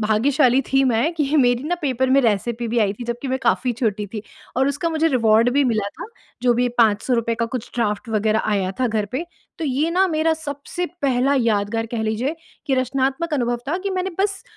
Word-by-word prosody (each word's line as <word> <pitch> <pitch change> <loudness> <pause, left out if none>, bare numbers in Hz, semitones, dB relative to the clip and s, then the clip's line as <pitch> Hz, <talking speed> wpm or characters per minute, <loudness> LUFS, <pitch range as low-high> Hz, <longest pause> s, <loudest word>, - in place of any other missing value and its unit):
भाग्यशाली 255 +5 +3
थी 270 0 +4
मैं 250 +7 +2
कि 300 -1 0
मेरी 245 -2 +3
ना 350 - 0
पेपर 260 -2 0
में 275 +1 +5
रेसिपी 235 +1 0
भी 235 +1 0
आई 200 -2 +2
थी, 240 - -8
जबकि 240 +3 -4
मैं 260 - 0
काफ़ी 250 -1 +1
छोटी 215 -3 -1
थी 210 - -4 0.3
और 265 +2 +3
उसका 290 +4 -1
मुझे 320 0 +2
रिवार्ड 230 -3 +3
भी 285 -1 +4
मिला 215 -5 0
था, - - -5 0.4
जो 245 -1 +4
भी 245 +1 +1
₹500 230 +1 +2
का 230 0 0
कुछ 245 0 -6
ड्राफ्ट 215 0 -1
वग़ैरह 215 0 +1
आया 190 -1 -1
था 255 - +3
घर 215 -2 -1
पे। 280 +7 -2 0.3
तो 330 - -3
ये 290 +5 0
ना 375 +2 +3
मेरा 320 +1 +2
सबसे 310 +3 -5 0.2
पहला 270 +1 +2
यादगार 225 0 0
कह 225 - -1
लीजिए 225 +8 -1 0.3
कि 270 - +2
रचनात्मक 270 +5 0
अनुभव 240 -2 0
था 350 - 0
कि 395 +1 -3
मैंने 375 0 -2
बस 395 -1 -1
250 Hz, 210 wpm, -21 LUFS, 225-285 Hz, 0.4 s, में